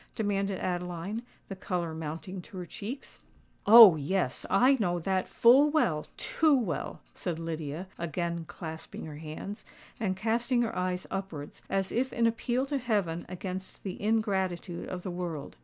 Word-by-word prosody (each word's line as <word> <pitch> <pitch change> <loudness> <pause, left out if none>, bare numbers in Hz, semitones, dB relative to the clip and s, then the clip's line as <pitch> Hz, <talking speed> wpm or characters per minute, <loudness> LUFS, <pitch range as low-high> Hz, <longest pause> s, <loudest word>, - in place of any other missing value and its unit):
demanded 200 -2 0
Adeline, 180 +4 -3 0.3
the 195 - -6
colour 175 -3 -2
mounting 165 +4 -5
to 190 - -12
her 180 - -4
cheeks. 230 +10 -7 0.5
"Oh! 220 -5 +11
yes,—I 190 - +2
know 175 -5 +1
that 185 +2 0
full 265 +6 +6
well—too 305 - +2
well," 220 -10 -3
said 175 -3 -3
Lydia, 165 +1 -4
again 170 0 -2
clasping 160 -1 -7
her 150 -2 -8
hands, 160 +6 -7 0.4
and 190 -4 -1
casting 235 +4 +1
her 230 - -3
eyes 180 0 -1
upwards, 180 -7 -5
as 195 -1 0
if 260 +2 0
in 235 - +1
appeal 240 +3 +1
to 280 0 -1
heaven 200 -9 -1
against 185 +1 -6
the 190 -2 -5
ingratitude 190 -5 -1
of 180 -1 -5
the 185 - -3
world. 175 -4 -5
190 Hz, 145 wpm, -29 LUFS, 170-220 Hz, 0.5 s, Oh